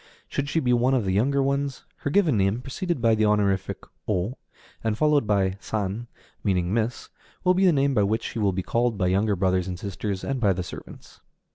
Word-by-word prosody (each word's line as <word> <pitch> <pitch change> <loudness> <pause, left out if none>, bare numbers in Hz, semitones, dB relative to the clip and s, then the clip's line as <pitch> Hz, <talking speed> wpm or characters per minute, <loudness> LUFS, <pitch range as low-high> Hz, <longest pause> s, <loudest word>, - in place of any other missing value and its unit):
Should 140 0 -2
she 165 - +1
be 125 -5 +2
one 125 +2 +3
of 125 - +1
the 95 - 0
younger 135 +7 +2
ones, 140 0 -1
her - - -3
given 160 - +3
name, 100 +3 +1
preceded 140 +1 -3
by 115 -1 +5
the 110 0 +2
honorific 100 -2 +1 0.2
O 105 +4 -1 0.5
and 110 -1 0
followed 150 -4 +3
by 95 -2 +1
San, 105 +3 -3 0.4
meaning 90 -3 +1
Miss, 115 +1 -1 0.3
will 180 0 +4
be 190 +1 +3
the - - +6
name 140 -2 +2
by 110 - +3
which 105 +3 +1
she - - -4
will 100 -2 +2
be 95 0 -3
called 120 +1 0
by 95 - +1
younger 100 +3 +2
brothers 95 -1 +1
and 90 -1 -4
sisters, 100 +1 -4
and 135 -1 -2
by 100 -5 +3
the 90 0 -3
servants. - - -11
110 Hz, 215 wpm, -25 LUFS, 95-135 Hz, 0.5 s, the